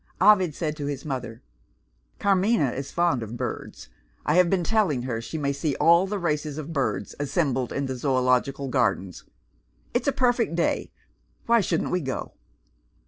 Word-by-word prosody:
Ovid 185 -5 +5
said 155 -3 -2
to 145 -2 -4
his 140 -1 -4
mother, 125 -5 -5 0.7
"Carmina 195 - +2
is 135 +2 -5
fond 170 -8 +1
of 115 +2 -6
birds. - - -6 0.4
I 150 - +2
have 180 0 +5
been 185 -1 +1
telling 185 - +1
her 120 -3 -3
she 115 +7 -6
may 140 -2 0
see 140 0 -1
all 170 +3 +5
the 205 +1 -2
races 150 -4 -2
of 155 +1 -6
birds 110 -9 -1
assembled 140 -3 0
in 140 - -2
the 130 -1 -3
Zoological 130 +1 +1
Gardens. 115 -8 -1 0.7
It's 245 - 0
a - - +5
perfect 245 -8 +1
day. 170 - 0 0.5
Why 235 -1 +4
shouldn't 170 -4 -1
we 180 - +1
go!" 135 -3 -4
145 Hz, 165 wpm, -25 LUFS, 130-180 Hz, 0.7 s, Ovid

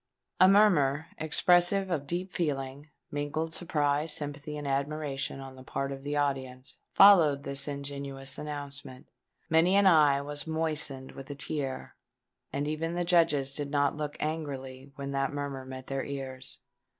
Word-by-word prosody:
A 185 - +8
murmur, 165 -8 +4
expressive 175 +4 +3
of 145 -5 -2
deep 180 +2 -3
feeling—mingled 145 +1 -4
surprise, 150 -2 0
sympathy, 145 0 -4
and 145 -1 -5
admiration—on 140 -1 -3
the 130 - -12
part 135 +1 -3
of 135 0 -6
the 145 +1 -3
audience, 130 -3 -2
followed 165 -9 +7
this 140 +1 -4
ingenuous 140 -1 -5
announcement. 140 -3 -7 0.4
Many 165 +4 +4
an 200 0 +5
eye 150 -6 +6
was 145 +2 -4
moistened 155 -4 -1
with 135 +1 -10
a 145 - -5
tear; 140 -2 -4 0.6
and 140 +2 -2
even 165 +2 -2
the 175 0 -1
Judges 160 -6 +3
did 145 0 -2
not 145 -1 +1
look 150 -1 -4
angrily 140 -4 -4
when 140 0 -5
that 135 0 0
murmur 140 -2 -4
met 130 0 -8
their 135 -1 -3
ears. 135 -2 -5
145 Hz, 145 wpm, -29 LUFS, 135-155 Hz, 0.6 s, A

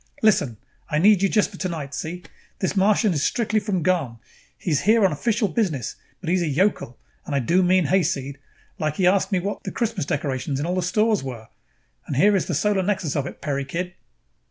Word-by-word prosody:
Listen, 145 - +3 0.3
I 150 - 0
need 195 +3 +5
you 195 - +3
just 210 0 +2
for 190 - -10
tonight, 160 -7 -4
see? 175 +5 -5 0.3
This 185 0 -2
Martian 200 +1 +3
is 145 - -1
strictly 220 +4 +1
from 195 -5 -2
gone. 165 -10 0 0.4
He 175 - -3
is 145 - +2
here 220 +1 +4
on 190 - +3
official 215 - 0
business, 170 - -1 0.2
but 180 - -10
he 170 - +2
is 185 - +2
a 170 - 0
yokel 150 - 0 0.3
and 145 - -4
I - - +3
do 170 +9 +2
mean 185 -1 +3
hayseed. 145 -6 0 0.4
Like 155 -1 -1
he 185 - +1
asked 190 +3 +3
me 190 - +2
what 200 +3 -4
the - - -4
Christmas 225 - -2
decorations 135 -1 -2
in 145 - -2
all 175 - -1
the 185 - 0
stores 210 +4 +1
were! 120 -5 -7 0.6
And - - -3
here 200 +9 +4
is 190 - 0
the - - -1
solar 195 +5 +1
nexus 185 -6 -1
of 140 -2 -1
it, - - -10
Peri, 140 -2 -2
kid." 175 +7 -4
180 Hz, 220 wpm, -23 LUFS, 145-200 Hz, 0.6 s, need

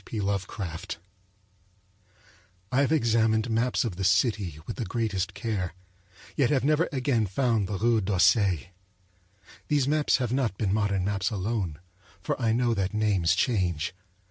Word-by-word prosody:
P. 110 - -5
Lovecraft 95 -2 -3 1.7
I 130 +2 +3
have 140 - +1
examined 115 -4 +2
maps 120 +3 +1
of 95 -7 -4
the 95 - -3
city 95 - +1
with 115 - -6
the 120 - -2
greatest 100 -5 -2
care, 100 -5 -3 0.6
yet 140 -5 +2
have 140 -4 +2
never 155 +3 +2
again 125 -6 +1
found 110 0 +1
the 100 0 -3
Rue 115 +1 +2
d'Auseil. 95 - +3 1.1
These 145 -3 +2
maps 150 0 +2
have 125 -3 -2
not 125 -7 0
been 100 -3 0
modern 100 -3 0
maps 100 -1 0
alone, 100 -6 -2 0.4
for 95 - -3
I 115 -2 +2
know 120 +1 +2
that 100 -1 -2
names 100 -6 +2
change. 90 - 0
110 Hz, 145 wpm, -27 LUFS, 95-120 Hz, 1.7 s, I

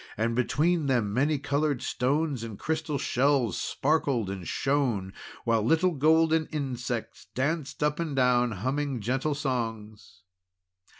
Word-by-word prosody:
And 115 +2 0
between 150 +6 +1
them 115 -6 +1
many 145 +5 +2
coloured 140 -1 -1
stones 140 +1 0
and 115 -3 -6
crystal 155 -2 -2
shells 130 -5 +1
sparkled 135 -8 0
and 95 -3 -6
shone. 125 -9 0 0.3
While 115 -2 +2
little 165 +10 +3
golden 160 +1 +3
insects 125 -6 -4
danced 150 +2 -1
up 150 +1 +1
and 160 -4 -2
down 125 -2 +3
humming 130 +4 -2
gentle 130 +7 -1
songs. 115 - -4
135 Hz, 125 wpm, -28 LUFS, 115-150 Hz, 0.3 s, little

